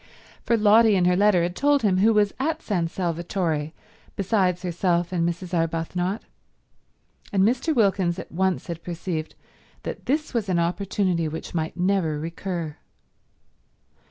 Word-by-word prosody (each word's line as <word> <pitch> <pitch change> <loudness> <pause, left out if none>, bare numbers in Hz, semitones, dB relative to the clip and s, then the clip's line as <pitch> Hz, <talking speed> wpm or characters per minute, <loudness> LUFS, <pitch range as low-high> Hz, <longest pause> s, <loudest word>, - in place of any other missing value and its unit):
For 235 - +1
Lotty 215 0 +5
in 180 -2 +3
her 180 0 +4
letter 200 -2 +4
had 175 +1 -2
told 285 +2 +2
him 190 -3 +3
who 220 +4 +5
was 210 -2 +3
at 315 +4 -1
San 175 -6 0
Salvatore 170 -3 -2 0.4
besides 190 -3 +1
herself 175 0 0
and 170 -2 +1
Mrs. 180 +1 -6
Arbuthnot, 170 +4 -1 1.1
and 195 -1 +3
Mr. 255 +9 +1
Wilkins 195 -6 +2
at 180 - -8
once 190 +2 0
had 170 -2 -6
perceived 170 -2 -4 0.5
that - - -6
this 300 +2 0
was 220 -5 -1
an 180 - +2
opportunity 180 0 0
which 160 +1 -6
might 160 0 -2
never 180 -4 +1
recur. 165 -1 -4
180 Hz, 145 wpm, -24 LUFS, 170-205 Hz, 1.1 s, Lotty